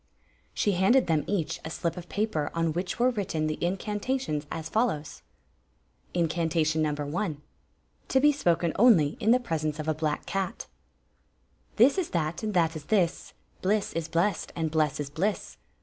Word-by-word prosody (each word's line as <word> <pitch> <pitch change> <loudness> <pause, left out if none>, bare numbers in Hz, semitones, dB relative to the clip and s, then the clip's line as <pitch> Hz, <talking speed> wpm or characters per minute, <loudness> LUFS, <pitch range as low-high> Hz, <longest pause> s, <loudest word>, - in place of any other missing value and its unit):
She 205 - +2
handed 195 +8 +4
them 160 -3 +1
each 170 -4 -1
a 160 - -5
slip 170 0 -2
of 175 -1 -9
paper 205 -8 -1
on 165 -1 +1
which 180 +2 -3
were 250 +2 +3
written 185 -8 -2
the 155 +1 -3
incantations, 200 - -2
as 160 -1 -4
follows; 155 - -1 0.9
Incantation 160 -2 +1
No. 155 - +2 0.3
i. 200 -8 -1 0.7
(To 265 - +3
be 295 +2 +6
^ken 175 - +1
only 200 -11 +6
in 220 - +1
the 245 +2 +6
presence 155 - -2
of 155 0 -5
a 155 - +2
hUxk 155 -1 -2
cat) 195 -2 -3 1.1
This 265 - +5
is 365 - -2
that, 160 -1 -2
and 215 -2 -3
that 165 -2 +2
is 150 -2 -7
this; 180 -4 0 0.3
Bliss 205 +2 0
is 165 -1 -2
blest, 175 +5 0
and 160 -2 -1
blest 155 -3 +1
is 145 -1 -4
bliss. 190 +7 -2
170 Hz, 165 wpm, -28 LUFS, 155-210 Hz, 1.1 s, be